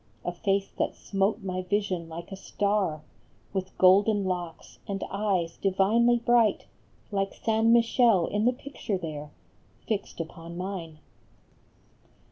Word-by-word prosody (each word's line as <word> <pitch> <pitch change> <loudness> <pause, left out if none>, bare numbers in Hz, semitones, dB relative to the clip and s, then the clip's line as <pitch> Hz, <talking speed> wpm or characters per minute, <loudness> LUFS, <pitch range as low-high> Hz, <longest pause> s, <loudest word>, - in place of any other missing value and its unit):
A 175 - 0
face 195 +2 -1
that - - 0
smote 200 +2 -1
my 185 -1 -2
vision 185 -3 -1
like 170 +4 -8
a - - -4
star; 195 -5 -1 0.5
With 190 -1 -4
golden 200 +2 +5
locks, 175 -3 -5
and 195 -1 -3
eyes 195 -5 -1
divinely 215 +5 +3
bright 235 -2 +3 0.5
Like 195 -1 -1
San 225 0 +2
Michele 230 -5 +4
in 210 +1 -1
the 250 - +4
picture 250 -6 -4
there 150 -4 -6 0.6
Fixed 210 -5 -3
upon 165 +1 -7
mine. 180 -4 -5
195 Hz, 125 wpm, -27 LUFS, 180-215 Hz, 0.6 s, golden